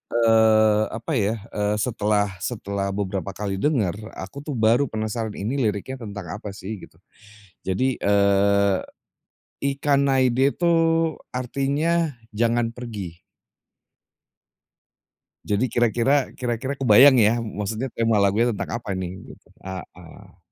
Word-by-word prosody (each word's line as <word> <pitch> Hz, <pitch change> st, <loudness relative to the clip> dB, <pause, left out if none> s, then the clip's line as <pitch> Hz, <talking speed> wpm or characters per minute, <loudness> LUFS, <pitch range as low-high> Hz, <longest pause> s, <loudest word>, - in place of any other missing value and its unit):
eee, 110 Hz, -2 st, +4 dB
apa 115 Hz, +6 st, -6 dB
ya, 105 Hz, +3 st, +1 dB, 0.2 s
eee, 105 Hz, 0 st, 0 dB
setelah 105 Hz, -3 st, 0 dB
setelah 100 Hz, -3 st, -3 dB
beberapa 100 Hz, -1 st, -3 dB
kali 100 Hz, -2 st, -3 dB
denger, 110 Hz, -, +1 dB, 0.2 s
aku 140 Hz, -, -8 dB
tuh 145 Hz, -1 st, -5 dB
baru 115 Hz, +5 st, +3 dB
penasaran 110 Hz, 0 st, -4 dB
ini 120 Hz, +8 st, -2 dB
liriknya 115 Hz, +3 st, -2 dB
tentang 100 Hz, -1 st, -7 dB
apa 100 Hz, -2 st, -8 dB
sih 105 Hz, +1 st, -7 dB
gitu. -, -, -30 dB, 0.7 s
Jadi, 125 Hz, +8 st, -1 dB
eee, 100 Hz, -1 st, +3 dB, 0.8 s
Ikanaide 140 Hz, -2 st, +2 dB
itu 175 Hz, -, -8 dB, 0.7 s
artinya 140 Hz, +5 st, 0 dB, 0.2 s
jangan 115 Hz, +2 st, +1 dB
pergi. 105 Hz, -8 st, -7 dB, 2.2 s
Jadi 105 Hz, +4 st, 0 dB
kira-kira 120 Hz, +4 st, +2 dB
kira-kira 125 Hz, +2 st, -2 dB
kebayang 130 Hz, +2 st, +7 dB
ya, 110 Hz, +1 st, +5 dB
maksudnya 110 Hz, +3 st, -4 dB
tema 115 Hz, -1 st, +1 dB
lagunya 110 Hz, +4 st, +2 dB
tentang 115 Hz, -, -4 dB
apa 100 Hz, -5 st, -5 dB
ini 95 Hz, -1 st, -3 dB, 0.3 s
gitu, -, -, -28 dB, 0.2 s
heeh. 90 Hz, -2 st, -10 dB
110 Hz, 115 wpm, -23 LUFS, 100-125 Hz, 2.2 s, kebayang